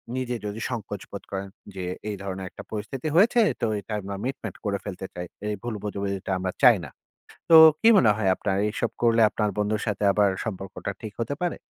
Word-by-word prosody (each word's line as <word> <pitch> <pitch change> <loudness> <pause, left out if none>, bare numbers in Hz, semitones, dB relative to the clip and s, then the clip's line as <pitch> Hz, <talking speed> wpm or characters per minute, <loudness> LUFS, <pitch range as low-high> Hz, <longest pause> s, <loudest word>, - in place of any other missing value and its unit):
নিজে 125 -1 -2
যদি 105 +1 -4
সংকোচ 105 -5 -5
বোধ 100 - -7
করেন। 95 0 -4 0.3
যে, 95 -1 -4 0.2
"এই 105 - -3
ধরনের 95 -1 -5
একটা - - -11
পরিস্থিতি 110 +7 -4
হয়েছে 220 +7 +5 0.2
তো 115 - +2
এটা 100 +2 -7
আমরা 100 +1 -5
মিটমাট 135 +2 -4
করে 100 -1 0
ফেলতে 95 -1 -6
চাই। 90 0 -6 0.2
এই 105 - -1
ভুল 120 -2 -3
বোঝাবুঝিটা 100 -2 -3
আমরা 95 0 -2
চাই 120 -4 +8
না।" - - -9 0.6
তো 165 - +10 0.2
কি 225 - +5
মনে 115 - +6
হয় 100 -3 +1
আপনার? 95 -2 -1
এইসব 105 - -2
করলে 115 -1 +4
আপনার 105 -2 0
বন্ধুর 105 0 0
সাথে 105 -1 -1 0.4
সম্পর্কটা 95 -2 -5
ঠিক 110 -2 -6
হতে 115 +5 -1
পারে? 175 -2 -1
105 Hz, 195 wpm, -25 LUFS, 100-120 Hz, 0.6 s, তো